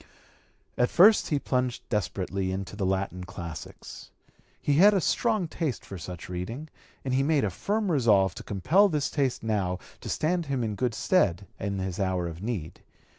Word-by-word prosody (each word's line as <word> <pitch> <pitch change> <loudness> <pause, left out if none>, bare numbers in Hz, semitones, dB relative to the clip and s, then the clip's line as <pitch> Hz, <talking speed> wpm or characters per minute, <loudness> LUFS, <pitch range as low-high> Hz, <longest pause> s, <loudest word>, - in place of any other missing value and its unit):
At 125 - +4
first 205 +5 +6
he 150 - +1
plunged 125 -3 -1
desperately 95 - -1
into 95 +1 -4
the 100 -3 -1
Latin 95 -1 -1
classics. 85 -3 -8 0.5
He 145 -1 +1
had 205 +4 +7
a - - +4
strong 215 +1 +1
taste 155 - -3
for 95 - -8
such 90 +1 -7
reading, 115 - -5 0.4
and 130 - -1
he 130 - +3
made 145 +1 +2
a 100 - 0
firm 205 - -1
resolve 105 - +4
to - - -9
compel 170 - +3
this 150 -4 -1
taste 135 -6 0
now 100 -5 0 0.2
to - - -7
stand 170 +1 0
him 135 -3 -1
in 110 -2 -1
good 120 +1 -1
stead 100 - +2
in 100 -1 -2
his 95 -1 -3
hour 95 -3 0
of 85 +1 -7
need. 100 -8 -4
110 Hz, 175 wpm, -27 LUFS, 95-150 Hz, 0.5 s, had